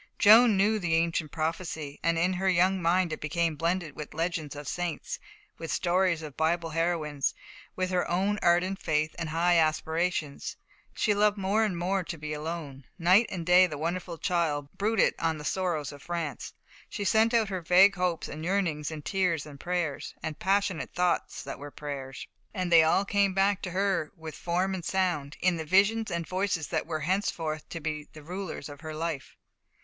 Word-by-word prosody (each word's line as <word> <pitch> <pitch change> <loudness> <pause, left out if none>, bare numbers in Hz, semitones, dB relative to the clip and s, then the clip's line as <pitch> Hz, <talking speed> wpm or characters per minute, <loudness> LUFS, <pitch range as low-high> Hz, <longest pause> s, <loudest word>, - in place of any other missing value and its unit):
Joan 220 0 +7
knew 210 +3 +3
the 175 -4 +1
ancient 165 -1 0
prophecy, 160 -2 -3
and 165 0 +1
in 180 +3 +2
her 190 +1 0
young 185 +1 +3
mind 170 0 +2
it - - -6
became 165 +1 0
blended 165 -1 -1
with 150 0 -8
legends 165 -3 -2
of 145 0 -7
the - - -3
saints, 175 -2 -4 0.4
with 165 - -5
stories 180 -2 +1
of 150 -3 -8
Bible 165 +1 0
heroines, 155 -4 0 0.4
with 185 0 -1
her 180 -1 0
own 195 +4 +1
ardent 185 +3 +2
faith 155 0 0
and 165 -2 -3
high 170 +2 +3
aspirations. 160 -1 -1 0.4
She 210 - +2
loved 210 0 +3
more 200 +3 +1
and 195 -5 -1
more 185 +2 0
to 165 - -5
be 150 0 -5
alone. 150 -3 -6
Night 185 +6 +5
and 175 -3 -5
day 180 +1 +6
the 150 -4 -6
wonderful 170 +2 -3
child 155 -5 0
brooded 215 +1 +2
on 160 -1 0
the 150 - -8
sorrows 175 -6 -1
of 145 -1 -12
France. 170 -2 -4 0.3
She 205 - -4
sent 220 +3 +3
out 225 -4 +2
her 185 -2 -3
vague 185 +4 +6
hopes 180 -2 -1
and 155 - -7
yearnings 170 -5 0
in 155 -2 -7
tears 180 -5 0
and 145 -2 -11
prayers, 175 -5 -3
and 155 -2 -4
passionate 195 -4 0
thoughts 180 -1 0
that - - -7
were 145 +1 -7
prayers, 140 -2 -7 0.3
and 185 -2 -2
they 165 -1 +8
all 160 +5 +3
came 200 -1 +2
back 195 0 +2
to 185 - -4
her 190 -4 0
with 160 -1 -8
form 180 +3 -1
and 185 -2 -4
sound, 175 -7 -1
in 180 -2 +2
the 160 - -3
visions 200 +7 +3
and 170 -1 -2
voices 185 -4 -1
that - - -1
were 155 -2 -3
henceforth 165 -3 -2
to 165 - -5
be 155 -1 -4
the 155 - -12
rulers 180 -2 -6
of 145 -2 -11
her 155 -1 -6
life. 160 -3 -4
170 Hz, 190 wpm, -28 LUFS, 155-185 Hz, 0.4 s, they